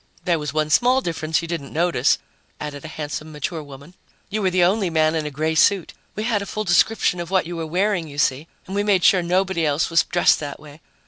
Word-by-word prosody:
"There 170 -3 +2
was 150 -3 -4
one 155 +1 -1
small 250 - +4
difference 160 - -2
you - - -5
didn't 160 -5 -5
notice," 165 -5 +2 0.4
added 145 -2 -6
a - - -7
handsome 155 0 -6
mature 155 +2 -4
woman. 140 +3 -13 0.4
"You 215 +1 -1
were 190 - +2
the 180 -1 +2
only 190 +1 +2
man 155 -1 +2
in 155 -2 -2
a - - -3
gray 155 +3 -1
suit. 185 +2 +2 0.2
We 215 - -3
had 220 -3 0
a 200 - -6
full 215 - -3
description 180 0 +2
of 170 -1 -5
what 190 -2 +1
you 175 +1 -6
were 165 -1 -4
wearing, 180 0 0
you 145 -1 -11
see, 140 +2 +1 0.2
and 190 - -6
we 205 - +1
made 200 -4 +2
sure 185 +3 +5
nobody 180 0 0
else 150 +2 0
was 165 - +5
dressed 175 - +3
that 145 -2 -6
way. 150 +1 -14
165 Hz, 240 wpm, -22 LUFS, 155-190 Hz, 0.4 s, sure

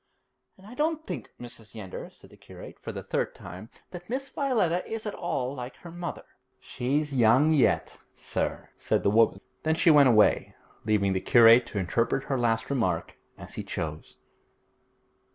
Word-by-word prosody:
'And 190 - -18
I 215 - -11
don't 315 +3 -1
think, 150 - -6
Mrs. 120 -2 -12
Yeander,' 95 -4 -7
said - - -19
the - - -15
curate, - - -13
for - - -6
the - - -7
third - - -2
time, 90 +6 -10 0.2
'that 175 +1 -10
Miss 270 +2 -4
Violetta 220 - 0
is 225 0 -4
at 210 - -3
all 135 -7 -3
like 125 -2 -7
her 170 - -12
mother.' 175 0 -6 0.3
'She's 145 +4 -2
young 130 +5 +4
yet, 140 -5 +1 0.2
sir,' - - -3
said - - 0
the 100 - +3
woman. 115 +1 +3 0.2
Then 160 0 +1
she 165 - +5
went 145 -3 +7
away, 110 -3 +3 0.3
leaving 100 -3 +2
the 95 - -1
curate 115 +1 +6
to - - -6
interpret 115 +8 0
her 135 -2 -2
last 115 0 0
remark 95 -11 -1 0.2
as - - -11
he - - -5
chose. 80 -1 -6
130 Hz, 170 wpm, -27 LUFS, 110-175 Hz, 0.3 s, went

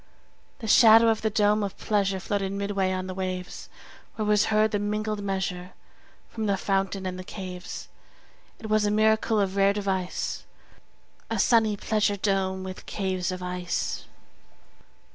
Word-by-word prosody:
30 - - -25
The 220 - -5
shadow 225 +1 +7
of 220 -1 +1
the 220 - +1
dome 210 0 +2
of 200 -1 -4
pleasure 200 -2 0
Floated 195 0 -2
midway 200 -1 -1
on 185 0 -2
the 185 - -5
waves; 185 -1 -5 0.5
Where 215 - -2
was 210 -1 +3
heard 215 0 +2
the 205 - 0
mingled 210 0 -2
measure 190 -2 -3 0.5
From 220 -2 -4
the 200 -1 +1
fountain 195 0 -1
and 185 0 -4
the - - -6
caves. 185 -2 -7 0.7
It 220 - -8
was 215 0 +2
a 205 - +2
miracle 220 +1 +2
of 195 -1 0
rare 200 0 +4
device, 190 -3 -2 0.9
35 225 - -1
A - - -3
sunny 220 -1 +3
pleasure 205 -1 0
dome 190 -1 0
with 185 0 -8
caves 185 -3 -2
of 185 0 -5
ice! 180 0 -3
200 Hz, 160 wpm, -26 LUFS, 190-215 Hz, 0.9 s, shadow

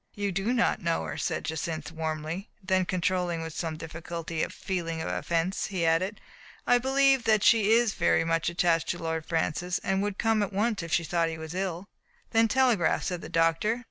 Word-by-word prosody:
"You 205 -1 -1
do 195 +5 -1
not 245 -2 +1
know 165 - 0
her," 75 -2 -5
said - - -2
Jacynth 160 0 -4
warmly; 160 +3 -4
then, 185 -1 +2
controlling 180 -2 -1
with 165 -1 -6
some 160 -1 -3
difficulty 165 0 -5
a - - 0
feeling 170 -4 -4
of 160 - -3
offense, 170 +3 -1
he 185 -4 -1
added, 180 +6 +1 0.5
"I 245 - +4
believe 270 0 +3
that 215 -2 +3
she 220 -2 +5
is 235 -2 +3
very - - +2
much 165 0 0
attached 170 -1 +1
to - - -1
Lord 160 -1 -3
Francis, 175 +2 -1
and 195 0 +1
would 205 -1 -2
come 225 -2 +2
at 205 - -1
once 215 +1 0
if 170 -1 -7
she 170 - +2
thought 165 0 +1
that 165 - -3
he - - -6
was 160 +1 -7
ill." 185 -1 -3 0.5
"Then 225 0 +4
telegraph," 240 -7 +2
said 180 -2 -3
the - - -8
doctor. 165 +8 +2
175 Hz, 205 wpm, -28 LUFS, 165-205 Hz, 0.5 s, she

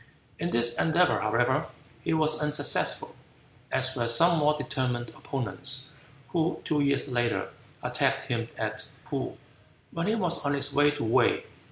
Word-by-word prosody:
In 170 - -1
this 120 -4 +4
endeavor, 175 +2 +3
however, 120 +8 +1 0.4
he - - -1
was 155 -1 +2
unsuccessful, 150 0 +1 0.6
as 130 0 +2
were 120 -2 -1
some 165 +8 +5
more 150 0 +2
determined 130 -5 -2
opponents, 135 -1 -3 0.4
who 165 -1 0
two 150 -2 +1
years 140 0 +1
later 120 -1 0 0.3
attacked - - +1
him 115 -1 -3
at 110 0 -3 0.2
Poo, - - -4 0.5
when 170 +2 -3
he 215 - +2
was 180 -8 0
on 140 0 0
his 140 - -1
way 145 +1 +4
to 145 -2 -3
Wei. 110 - +2
140 Hz, 150 wpm, -27 LUFS, 120-155 Hz, 0.6 s, some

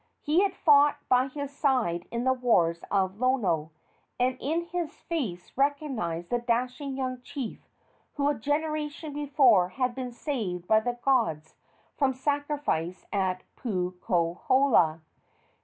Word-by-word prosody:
He 310 +5 +3
had 395 -2 +1
fought 290 -1 +5
by 255 +1 +4
his 285 +1 -6
side 240 - +1
in 235 0 -2
the 260 0 +3
wars 175 -10 +2
of 195 0 0
Lono, 205 - +1 0.5
and 255 +1 +2
in 320 +5 0
his 340 -2 -3
face 225 - -4
recognized 265 - -1
the 240 - +2
dashing 250 +3 -2
young 255 -1 -3
chief 265 -2 -7 0.5
who 285 -1 +1
a 295 - +3
generation 300 +3 -2
before 270 -10 +4
had 250 +4 -1
been 255 -1 -5
saved 215 - -4
by 220 - +5
the 240 +2 -3
gods 165 - +1 0.5
from 265 -3 +2
sacrifice 285 - -2
at 185 -2 0
Puukohola. 180 - +1
255 Hz, 130 wpm, -28 LUFS, 185-285 Hz, 0.5 s, fought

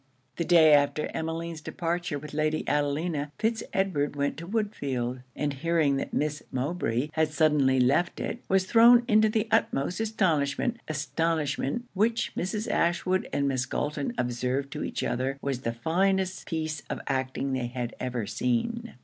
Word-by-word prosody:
The 170 - -1
day 160 -3 +6
after 145 +1 +2
Emmeline's 165 0 -4
departure 175 0 -2
with 150 +1 -9
Lady 155 +1 0
Adelina, 145 +1 0
Fitz 225 0 0
Edward 155 -7 0
went 140 0 0
to 170 +2 -7
Woodfield; 140 - -2
and 145 -1 -1
hearing 155 -1 +1
that - - -3
Miss 150 0 -1
Mowbray 130 -1 -1
had 160 -1 +2
suddenly 150 -4 +3
left 140 +8 +2
it, - - -3
was 190 -1 +3
thrown 235 +3 +7
into 215 0 +5
the 215 +1 0
utmost 140 +8 +1
astonishment 205 - +1
astonishment 155 - -1
which 225 +4 +1
Mrs. 210 +4 -2
Ashwood 180 +2 +1
and 140 0 +1
Miss 130 -1 0
Galton 145 -2 -2
observed 125 +3 -1
to - - -4
each - - -3
other 130 +2 -1
was 135 -3 -3
the 115 - -1
finest 185 +9 0
piece 155 -3 -3
of - - -3
acting 135 0 -1
they 130 -2 -1
had 120 -1 -4
ever 125 -3 -2
seen. 230 - -2
155 Hz, 155 wpm, -27 LUFS, 135-180 Hz, -, thrown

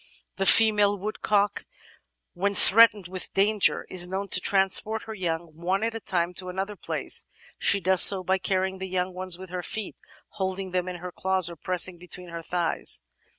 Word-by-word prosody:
The 195 -1 0
female 210 -2 +5
woodcock, 205 0 -1 0.7
when 200 +3 -2
threatened 210 -2 +5
with 185 0 -6
danger, 205 +1 +1
is 180 -1 +3
known 195 +2 -5
to 180 - +1
transport 200 +3 +2
her 220 - -8
young, 170 -4 -4
one 185 +5 -2
at 230 0 -2
a 225 - -5
time, 175 -4 -2
to 185 -1 -8
another 195 +3 -5
place. - - -2 0.3
She 200 - +2
does 185 0 +1
so 190 -2 +8
by 190 +1 0
carrying 190 0 -2
the 190 0 -6
young 180 0 -2
ones 185 -1 -3
with 185 -1 -11
her 180 -1 -4
feet, 210 +4 -6 0.3
holding 190 -1 -5
them 180 0 -2
in 180 - -5
her 180 +1 -8
claws, 185 -1 0
or - - -9
pressed 180 +1 +1
between 180 0 -9
her 170 0 -7
thighs. 165 - -1
190 Hz, 185 wpm, -25 LUFS, 180-200 Hz, 0.7 s, so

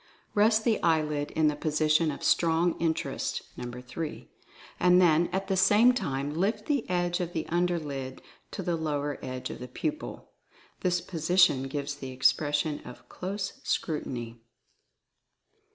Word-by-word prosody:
Rest 215 +1 +4
the 225 -2 +1
eyelid 150 -3 +1
in 155 -1 +2
the 150 - +1
position 155 +1 +2
of 145 - -5
Strong 165 +1 +3
Interest 160 -1 -1 0.2
(No. 120 0 -6
3), 150 +5 -6 0.5
and 180 0 +5
then 170 -1 +4
at 190 +1 -2
the 190 - +1
same 210 +6 +5
time 140 - -2
lift 210 +6 0
the 280 -9 -1
edge 175 -1 0
of 175 -1 -3
the 160 - -2
under 175 +1 +1
lid 135 -4 -5 0.3
to 195 - -5
the 175 -1 0
lower 145 -3 -2
edge 130 -1 -5
of - - -8
the 125 - -7
pupil. 305 - -5 0.5
This 180 -1 +1
position 165 -5 +3
gives 145 +1 -3
the 135 -2 -7
expression 145 +4 +1
of 125 - -12
Close 195 +1 -5
Scrutiny. 120 -7 -3
160 Hz, 150 wpm, -28 LUFS, 145-180 Hz, 0.5 s, and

